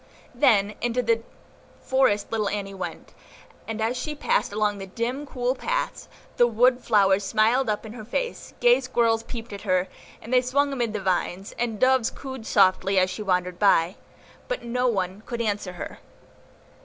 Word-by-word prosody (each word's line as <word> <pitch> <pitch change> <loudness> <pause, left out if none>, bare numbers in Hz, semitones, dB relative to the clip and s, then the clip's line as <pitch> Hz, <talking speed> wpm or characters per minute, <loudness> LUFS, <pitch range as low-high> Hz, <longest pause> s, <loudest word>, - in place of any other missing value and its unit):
Then 205 -1 +3
into 240 +1 0
the 230 0 +2 0.6
forest 260 -6 +1
little 215 -2 0
Annie 200 -1 -4
went; 180 -3 -7 0.5
and 225 -1 -4
as 225 +3 0
she 300 +5 -4
passed 285 - 0
along 205 -1 0
the 195 - -7
dim, 245 +8 -3
cool 250 -1 -1
paths, - - -3 0.3
the 240 - +6
wood 245 +2 +3
flowers 200 -3 +3
smiled 220 +5 +2
up 210 +1 -2
in 220 - -8
her 230 -3 -8
face, 480 - -4
gay 485 0 +5
squirrels 230 -1 +1
peeped 230 -1 -8
at 200 - -7
her, 185 -2 +1 0.3
as 230 - -10
they 250 -1 +5
swung 280 +3 +1
amid 240 -5 -1
the 210 - -3
vines, 190 +1 -1
and 230 -3 -3
doves 260 -2 +3
cooed 265 -4 -8
softly 195 -1 +3
as 185 0 +3
she 185 - -6
wandered 180 -2 -1
by; 185 -3 +4 0.5
but - - -3
none 230 -6 -1
could 235 - -4
answer 205 -4 -2
her. 175 - -8
225 Hz, 170 wpm, -25 LUFS, 195-250 Hz, 0.6 s, the